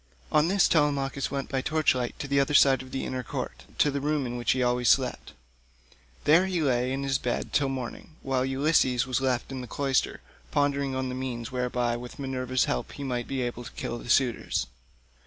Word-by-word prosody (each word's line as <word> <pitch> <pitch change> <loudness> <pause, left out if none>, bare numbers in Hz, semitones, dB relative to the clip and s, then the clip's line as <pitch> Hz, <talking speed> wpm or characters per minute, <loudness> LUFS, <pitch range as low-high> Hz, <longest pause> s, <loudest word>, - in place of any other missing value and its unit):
On 155 +1 +4
this 195 +1 +4
Telemachus 140 -3 +1
went 140 -1 -3
by 135 -1 0
torch 155 +2 +2
light 125 -2 -3
to 145 - -5
the 140 0 +2
other 140 +1 +1
side 135 -2 +6
of 130 - -11
the 135 - -3
inner 130 -1 -3
court, 120 - -6
to 145 - +3
the 140 0 -2
room 150 -1 0
in 120 0 -4
which 120 -1 +1
he 130 -1 0
always 125 0 +2
slept. 130 -1 +1 0.9
There 165 +6 +5
he 185 -2 -1
lay 125 -2 +1
in 135 +1 -2
his 135 -1 +1
bed 120 - -3
till 140 -2 +2
morning, 135 +4 -6
while 130 -1 0
Ulysses 135 -2 +2
was 130 0 -1
left 130 -1 0
in 130 -1 -4
the 125 - -7
cloister 135 0 0 0.3
pondering 140 - +1
on 130 0 -2
the - - -4
means 125 -2 -4
whereby 125 -1 0
with 125 0 -9
Minerva's 130 -2 0
help - - -2
he 140 - -7
might 125 -3 -2
be 135 -2 -2
able 120 0 -4
to - - -9
kill 120 - -4
the 120 - -10
suitors. 125 -3 +2
130 Hz, 210 wpm, -27 LUFS, 125-140 Hz, 0.9 s, side